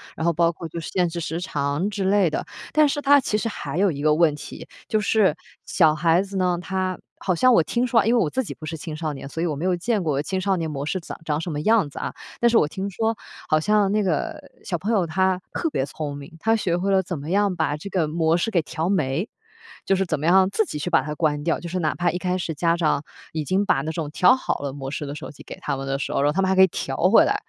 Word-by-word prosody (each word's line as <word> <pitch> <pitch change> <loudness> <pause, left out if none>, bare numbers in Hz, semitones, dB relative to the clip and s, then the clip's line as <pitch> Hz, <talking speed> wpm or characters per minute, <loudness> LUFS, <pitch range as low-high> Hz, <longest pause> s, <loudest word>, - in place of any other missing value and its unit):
然 160 - -3
后 170 - +4
包 170 +1 +2
括 165 0 -8
就 170 - -5
是 160 - -6
限 180 -2 +1
制 170 +1 -5
时 165 0 -3
长， 145 +3 -1
之 195 -2 -3
类 195 -3 +3
的。 - - -3 0.3
但 305 -1 +5
是 290 +1 -1
它 285 0 +6
其 210 -4 -1
实 230 +1 -2
还 175 - -5
有 195 -2 +3
一 140 -1 -5
个 150 0 +4
问 160 -2 +4
题。 145 - -9 0.2
就 215 - +1
是 210 -1 +3 0.3
小 160 -4 +4
孩 165 +3 +3
子 195 0 -5
呢， 180 -1 +1
它 185 0 -2 0.2
好 185 - 0
像 255 +6 +5
我 170 - +6
听 240 +9 0
说， 230 -4 +3
因 230 - +3
为 - - +4
我 150 - -1
自 260 - -1
己 - - -6
不 155 - -10
是 160 +1 -5
青 155 0 -6
少 155 -1 -3
年， 135 0 -8
所 165 +3 -5
以 - - +1
我 155 -4 -1
没 160 +6 -4
有 185 -1 +2
见 210 +3 0
过 145 -3 0
青 190 +4 -2
少 195 0 +1
年 165 -2 -2
模 140 -1 -4
式 185 +4 -1
长 170 - -8
长 150 0 0
什 175 - -4
么 145 - -3
样 215 -5 +3
子 - - -8
啊。 - - -4 0.3
但 235 - +4
是 230 - +4
我 150 - +4
听 195 +5 -4
说 225 +3 -1 0.3
好 155 - +4
像 205 +2 +2
那 210 0 +2
个 300 - -1 0.2
小 175 - -2
朋 205 +8 -2
友 195 -6 +2
他 185 +2 +1
特 330 - -1
别 135 - -1
聪 145 0 -5
明， 145 +3 -11
他 225 +4 +2
学 175 -5 0
会 195 +2 0
了 190 -1 +4
怎 175 -3 -4
么 150 +3 -7
样 200 -2 +2
把 155 -3 0
这 200 +6 -8
个 175 -5 0
模 160 +1 +1
式 200 - 0
给 175 -5 +2
调 160 +3 -3
没。 160 - 0 0.6
就 195 - +3
是 195 - +1
怎 155 -3 -1
么 155 - -3
样 190 +2 +5
自 220 - +1
己 150 - -5
去 - - -3
把 - - +4
它 150 +2 -5
关 150 -2 0
掉。 165 - 0
就 170 - -7
是 185 +1 -2
哪 155 -2 0
怕 175 0 +1
一 180 - -3
开 180 0 -1
始 170 -2 -3
家 170 +3 +1
长 155 -3 +1 0.3
已 155 -1 -2
经 190 +6 +1
把 135 - +2
那 155 +2 -3
种 160 -2 -4
调 240 +11 +5
好 260 - -2
了 140 -1 -3
模 135 -2 -6
式 150 - -4
的 140 - -5
手 - - -7
机 145 - -14
给 - - -9
他 - - -2
们 135 - -5
的 135 0 -1
时 - - -3
候， - - +1
然 145 - +3
后 - - 0
他 195 - +1
们 190 - +2
还 190 - +2
可 190 - +6
以 190 - +8
调 135 -5 -4
回 225 - +6
来。 - - +1
175 Hz, 320 characters per minute, -23 LUFS, 155-195 Hz, 0.6 s, 以